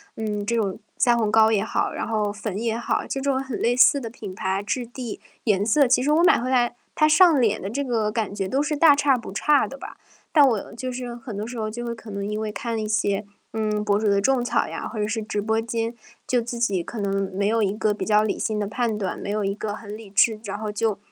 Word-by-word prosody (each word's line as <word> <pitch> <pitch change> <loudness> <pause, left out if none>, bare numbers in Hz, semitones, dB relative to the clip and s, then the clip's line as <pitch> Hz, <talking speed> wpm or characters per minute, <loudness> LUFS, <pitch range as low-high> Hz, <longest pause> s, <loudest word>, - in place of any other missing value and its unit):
嗯， 210 -2 -3
这 235 - 0
种 205 -4 -1 0.2
腮 240 -1 +4
红 215 -2 +1
膏 220 0 +5
也 210 -2 +2
好， 220 - -1
然 - - -4
后 210 -2 0
粉 205 -1 -5
也 225 +2 -1
好， 235 - -1
这 270 - -2
种 270 -1 0
很 265 -4 -5
类 240 +1 +2
似 275 +3 +6
的 230 -3 -6
品 200 -5 -8
牌、 190 0 -1
质 240 +4 -2
地、 240 -1 -7 0.3
颜 205 -3 +2
色。 275 +5 +4
其 250 +1 +3
实 295 - +2
我 320 +3 +4
买 355 - +5
回 255 +2 -2
来， 245 -2 +2 0.2
它 305 - +4
上 315 -3 +6
脸 215 -3 +2
的 195 - -5
这 275 +7 -2
个 225 -5 0
感 215 -3 -2
觉 195 -2 -2
都 265 +8 0
是 295 +1 -1
大 295 -1 +6
差 280 -2 +3
不 230 - -8
差 290 +7 +3
的 275 - -9
吧。 275 - -10 0.3
但 290 -3 +6
我 225 -6 -1
就 255 +2 -5
是， 245 -1 -5
很 235 -3 -8
多 210 +2 -4
时 240 0 -7
候 215 -1 -2
就 240 +3 -6
会 235 - -3
可 225 -1 -11
能 200 0 -4
因 210 +1 -3
为 215 -1 -3
看 230 +2 -4
了 220 - -2
一 215 - -3
些， 210 -1 0 0.3
嗯， 215 -1 -1
博 205 0 +2
主 220 - 0
的 200 -1 +3
种 255 +3 +2
草 245 - +1
呀， - - -5
或 230 - -8
者 210 0 0
是 220 +1 -2
直 210 -1 -3
播 220 +2 0
间， 230 0 -2 0.3
就 250 -1 +2
自 235 +1 -5
己 200 -7 +1
可 230 - -8
能 195 -1 -1
没 200 0 +1
有 225 +1 +2
一 200 -2 +2
个 210 0 0
比 205 - -5
较 210 -1 +3
理 215 - -1
性 215 - -1
的 205 - -1
判 220 +1 -1
断， 195 -3 -3
没 - - -6
有 210 0 -1
一 195 - 0
个 210 0 -4
很 210 -1 -8
理 215 -2 -11
智 215 +3 +3
然 200 -2 -4
后 215 0 -4
就 210 -1 0
220 Hz, 295 characters per minute, -24 LUFS, 210-245 Hz, 0.3 s, 似